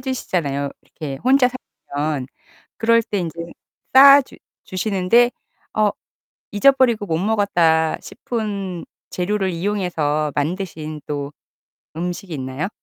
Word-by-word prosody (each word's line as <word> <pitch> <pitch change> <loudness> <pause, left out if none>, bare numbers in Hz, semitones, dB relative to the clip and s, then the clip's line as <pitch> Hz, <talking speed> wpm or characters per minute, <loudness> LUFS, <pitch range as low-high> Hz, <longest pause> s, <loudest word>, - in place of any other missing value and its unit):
주시잖아요 165 - -2
이렇게 140 -4 -7
혼자 260 -1 +5 0.5
살면. 145 -2 -1 0.5
그럴 230 0 +4
때 205 - -2
인제 170 -1 -5 0.5
싸 275 +1 +9
주 - - -15 0.3
주시는데, 200 +5 +2 0.5
'어 215 -1 +4 0.6
잊어버리고 240 -1 +4
못 160 -3 0
먹었다.' 175 -6 +2
싶은 200 -6 -4 0.3
재료를 190 +1 -1
이용해서 165 -5 -1
만드신 155 -1 -3
또 145 0 -4 0.6
음식이 180 +2 -4
있나요? 130 +6 -4
185 Hz, 245 characters per minute, -20 LUFS, 155-215 Hz, 0.6 s, 싸